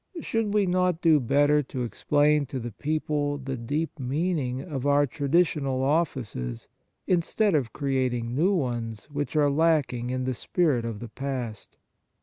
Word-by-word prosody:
Should 225 Hz, -8 st, -1 dB
we 205 Hz, -1 st, +4 dB
not 180 Hz, -2 st, +1 dB
do 160 Hz, -3 st, +5 dB
better 145 Hz, +4 st, +3 dB
to 130 Hz, -2 st, -5 dB
explain 145 Hz, +4 st, +2 dB
to 130 Hz, -, -4 dB
the 120 Hz, 0 st, -5 dB
people 150 Hz, +2 st, -1 dB
the 135 Hz, -1 st, -4 dB
deep 145 Hz, +7 st, -3 dB
meaning 135 Hz, -1 st, -1 dB
of 140 Hz, -2 st, -4 dB
our 145 Hz, 0 st, +4 dB
tra 140 Hz, +1 st, -4 dB
ditional 140 Hz, -5 st, +2 dB
offices 130 Hz, -, -1 dB, 0.4 s
instead 185 Hz, +4 st, +1 dB
of 135 Hz, -7 st, +1 dB
creating 130 Hz, -4 st, -1 dB
new 165 Hz, +9 st, +2 dB
ones 120 Hz, -, -3 dB
which 145 Hz, +1 st, -3 dB
are 145 Hz, -2 st, +4 dB
lacking 145 Hz, -6 st, +1 dB
in 130 Hz, 0 st, -2 dB
the 130 Hz, 0 st, -1 dB
spirit 140 Hz, -2 st, 0 dB
of 115 Hz, -3 st, -5 dB
the 120 Hz, -, -7 dB
past 125 Hz, -4 st, -5 dB
140 Hz, 155 wpm, -26 LUFS, 125-155 Hz, 0.4 s, do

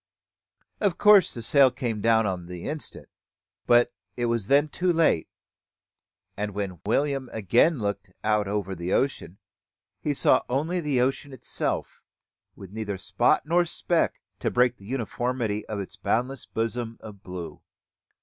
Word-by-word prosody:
Of 200 Hz, -5 st, +1 dB
course 210 Hz, -2 st, +6 dB
the 115 Hz, -, -5 dB
sail 135 Hz, +3 st, +6 dB
came 120 Hz, -4 st, -3 dB
down 115 Hz, 0 st, +4 dB
upon 90 Hz, -3 st, -3 dB
the 90 Hz, -1 st, -8 dB
instant; 150 Hz, +1 st, -4 dB, 0.6 s
but 120 Hz, 0 st, +5 dB, 0.2 s
it 120 Hz, -, 0 dB
was 115 Hz, -4 st, -1 dB
then 145 Hz, +3 st, +4 dB
too 180 Hz, +4 st, 0 dB
late; 165 Hz, -, +2 dB, 1.1 s
and 105 Hz, -1 st, -4 dB
when 95 Hz, -5 st, -4 dB
William 135 Hz, +2 st, 0 dB
again 120 Hz, -, +3 dB
looked 100 Hz, -3 st, -3 dB
out 105 Hz, -1 st, +2 dB
over 100 Hz, -1 st, -2 dB
the 85 Hz, +1 st, -3 dB
ocean, 135 Hz, -9 st, -1 dB, 0.6 s
he 145 Hz, -1 st, -1 dB
saw -, -, +4 dB
only 155 Hz, +8 st, 0 dB
the 145 Hz, -5 st, 0 dB
ocean 135 Hz, +2 st, -1 dB
itself, 130 Hz, -, -3 dB, 0.5 s
with 95 Hz, -2 st, -11 dB
neither 105 Hz, -2 st, -4 dB
spot 90 Hz, -, +2 dB
nor 170 Hz, +3 st, +3 dB
speck 170 Hz, 0 st, 0 dB, 0.2 s
to -, -, 0 dB
break 125 Hz, 0 st, +2 dB
the 100 Hz, -, -15 dB
uniformity 120 Hz, -2 st, -2 dB
of 105 Hz, -2 st, -4 dB
its 100 Hz, -, -7 dB
boundless 125 Hz, +3 st, -1 dB
bosom 115 Hz, 0 st, -3 dB
of 105 Hz, -3 st, -11 dB
blue. 90 Hz, -3 st, -8 dB
115 Hz, 150 wpm, -26 LUFS, 100-140 Hz, 1.1 s, course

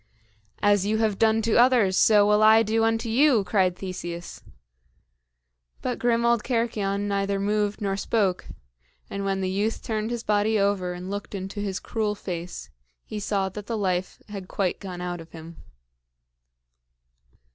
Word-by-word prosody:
"As 205 Hz, -2 st, +4 dB
you 215 Hz, +2 st, 0 dB
have 215 Hz, -3 st, 0 dB
done 220 Hz, 0 st, +3 dB
to 230 Hz, 0 st, +2 dB
others, 240 Hz, -6 st, +4 dB
so 210 Hz, +1 st, +5 dB
will 210 Hz, +1 st, +3 dB
I 220 Hz, +1 st, +7 dB
do 225 Hz, +1 st, +1 dB
unto 225 Hz, +1 st, +1 dB
you!" 245 Hz, -1 st, +4 dB
cried 185 Hz, -1 st, +1 dB
Theseus. 175 Hz, -2 st, -7 dB, 1.4 s
But 250 Hz, -1 st, -2 dB
grim 235 Hz, -1 st, +1 dB
old 235 Hz, -2 st, +2 dB
Cercyon 220 Hz, -5 st, -1 dB
neither 200 Hz, 0 st, -1 dB
moved 205 Hz, +1 st, 0 dB
nor 195 Hz, -1 st, 0 dB
spoke; 200 Hz, -2 st, 0 dB, 0.6 s
and 200 Hz, -, -3 dB
when 195 Hz, -1 st, -1 dB
the 190 Hz, -, -1 dB
youth 205 Hz, +4 st, -1 dB
turned 220 Hz, -1 st, -2 dB
his 240 Hz, -1 st, -4 dB
body 210 Hz, +1 st, +2 dB
over 200 Hz, -3 st, 0 dB
and 180 Hz, +2 st, -7 dB
looked 205 Hz, 0 st, -5 dB
into 195 Hz, +2 st, -5 dB
his 200 Hz, -1 st, -3 dB
cruel 215 Hz, -3 st, -2 dB
face, 175 Hz, -, -6 dB, 0.3 s
he 210 Hz, -, -5 dB
saw 200 Hz, -1 st, -1 dB
that 205 Hz, +2 st, -9 dB
the 230 Hz, -, -2 dB
life 185 Hz, -3 st, -2 dB
had 200 Hz, -3 st, -7 dB
quite 190 Hz, -2 st, -1 dB
gone 180 Hz, -3 st, -7 dB
out 175 Hz, -1 st, -4 dB
of 165 Hz, 0 st, -15 dB
him. 165 Hz, 0 st, -10 dB
205 Hz, 160 wpm, -25 LUFS, 190-220 Hz, 1.4 s, I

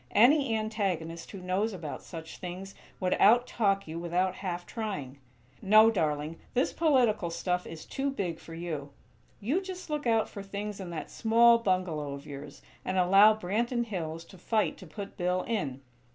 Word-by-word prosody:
Any 250 Hz, +2 st, +5 dB
antagonist 195 Hz, -7 st, -2 dB
who 200 Hz, -, -8 dB
knows 195 Hz, +4 st, 0 dB
about 160 Hz, -5 st, -6 dB
such 160 Hz, -1 st, -9 dB
things 185 Hz, +2 st, -7 dB, 0.3 s
would 185 Hz, -1 st, +1 dB
out 240 Hz, +4 st, +6 dB
talk 195 Hz, -6 st, 0 dB
you 160 Hz, +1 st, -5 dB
without 180 Hz, +2 st, 0 dB
half 175 Hz, -2 st, -4 dB
trying. 145 Hz, -, -5 dB, 0.4 s
No, 215 Hz, +3 st, +7 dB
darling, 155 Hz, -4 st, -1 dB, 0.2 s
this 255 Hz, -, +2 dB
political 250 Hz, -, +2 dB
stuff 180 Hz, +2 st, -2 dB
is 160 Hz, -1 st, -8 dB
too 275 Hz, 0 st, -2 dB
big 185 Hz, -11 st, -3 dB
for 165 Hz, -, -10 dB
you. 155 Hz, -4 st, -5 dB, 0.5 s
You 275 Hz, -, 0 dB
just 370 Hz, -4 st, -7 dB
look 295 Hz, -4 st, -1 dB
out 225 Hz, -1 st, +3 dB
for 200 Hz, -, -8 dB
things 200 Hz, +1 st, -5 dB
in 190 Hz, -2 st, -6 dB
that 165 Hz, -3 st, -6 dB
small 235 Hz, +1 st, +5 dB
bungalow 180 Hz, -8 st, -1 dB
of 140 Hz, -, -11 dB
yours, 145 Hz, 0 st, -9 dB, 0.2 s
and 185 Hz, -, -2 dB
allow 195 Hz, +4 st, +7 dB
Branton 235 Hz, +5 st, -1 dB
Hills 165 Hz, -6 st, -5 dB
to 190 Hz, -, -15 dB
fight 215 Hz, +4 st, +1 dB
to 185 Hz, -, -11 dB
put 200 Hz, +4 st, -8 dB
Bill 180 Hz, 0 st, 0 dB
in. 145 Hz, -, -2 dB
190 Hz, 170 wpm, -29 LUFS, 170-220 Hz, 0.5 s, No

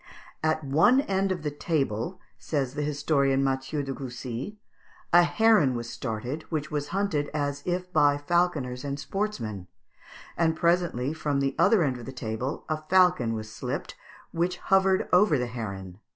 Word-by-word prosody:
"At 155 Hz, 0 st, 0 dB
one 160 Hz, -, +4 dB
end 195 Hz, -5 st, 0 dB
of 175 Hz, -4 st, -3 dB
the 150 Hz, -, -1 dB
table," 145 Hz, -, -2 dB, 0.2 s
says 135 Hz, -4 st, -2 dB
the 150 Hz, -, -3 dB
historian 140 Hz, -2 st, +1 dB
Mathieu 135 Hz, +2 st, -1 dB
de 135 Hz, 0 st, -4 dB
Coucy, 130 Hz, -, -6 dB, 0.6 s
"a 175 Hz, -, +9 dB
heron 190 Hz, -, +4 dB
was 120 Hz, 0 st, -5 dB
started, 125 Hz, +5 st, -4 dB
which 155 Hz, -2 st, -3 dB
was 145 Hz, -1 st, -2 dB
hunted 185 Hz, -7 st, -1 dB
as 145 Hz, -1 st, -1 dB
if 180 Hz, 0 st, -2 dB
by 145 Hz, -1 st, +4 dB
falconers 145 Hz, -5 st, 0 dB
and 140 Hz, 0 st, -3 dB
sportsmen; 125 Hz, -, -3 dB, 0.7 s
and 160 Hz, -1 st, +2 dB
presently 170 Hz, -6 st, +1 dB
from 150 Hz, -3 st, -1 dB
the 135 Hz, -1 st, 0 dB
other 220 Hz, -7 st, +5 dB
end 130 Hz, -4 st, -1 dB
of 115 Hz, -, -10 dB
the -, -, -5 dB
table 125 Hz, +2 st, -4 dB
a 155 Hz, 0 st, -2 dB
falcon 175 Hz, -8 st, +3 dB
was 110 Hz, 0 st, -6 dB
slipped, -, -, -4 dB, 0.4 s
which 175 Hz, +2 st, -1 dB
hovered 190 Hz, 0 st, +2 dB
over 180 Hz, -4 st, +5 dB
the 125 Hz, -, -1 dB
heron. 100 Hz, -6 st, -6 dB
145 Hz, 160 wpm, -27 LUFS, 130-175 Hz, 0.7 s, a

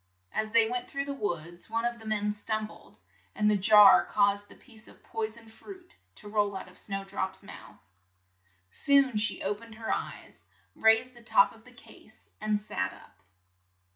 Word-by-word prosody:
As 215 Hz, 0 st, -2 dB
they 230 Hz, -1 st, +5 dB
went 245 Hz, +1 st, -3 dB
through 275 Hz, 0 st, -3 dB
the 280 Hz, -, -4 dB
woods, 175 Hz, -, -5 dB
one 230 Hz, +1 st, -1 dB
of 240 Hz, 0 st, -2 dB
the 220 Hz, -, -11 dB
men 210 Hz, -1 st, 0 dB
stum 215 Hz, +1 st, -2 dB
bled, -, -, -17 dB, 0.4 s
and 210 Hz, -, +1 dB
the -, -, +3 dB
jar 210 Hz, +1 st, +7 dB
caused 205 Hz, 0 st, +1 dB
the -, -, -14 dB
piece 225 Hz, -4 st, -11 dB
of -, -, -18 dB
poi 225 Hz, -1 st, -3 dB
soned 225 Hz, 0 st, -14 dB
fruit 375 Hz, -, -13 dB, 0.2 s
to 210 Hz, -, -12 dB
roll 205 Hz, -1 st, 0 dB
out 190 Hz, -, -9 dB
of 180 Hz, -, -16 dB
Snow 195 Hz, -1 st, -4 dB
drop's 195 Hz, -1 st, -4 dB
mouth. -, -, -12 dB, 0.9 s
Soon 275 Hz, -, +4 dB
she 210 Hz, +2 st, 0 dB
o 200 Hz, -, 0 dB
pened 225 Hz, +1 st, -13 dB
her 225 Hz, 0 st, -2 dB
eyes, -, -, -7 dB, 0.3 s
raised 225 Hz, +3 st, +3 dB
the 240 Hz, -, -15 dB
top -, -, +4 dB
of -, -, -20 dB
the -, -, -15 dB
case -, -, -19 dB
and 215 Hz, -1 st, 0 dB
sat 100 Hz, -, -3 dB
up. -, -, -18 dB
215 Hz, 190 wpm, -29 LUFS, 205-230 Hz, 0.9 s, jar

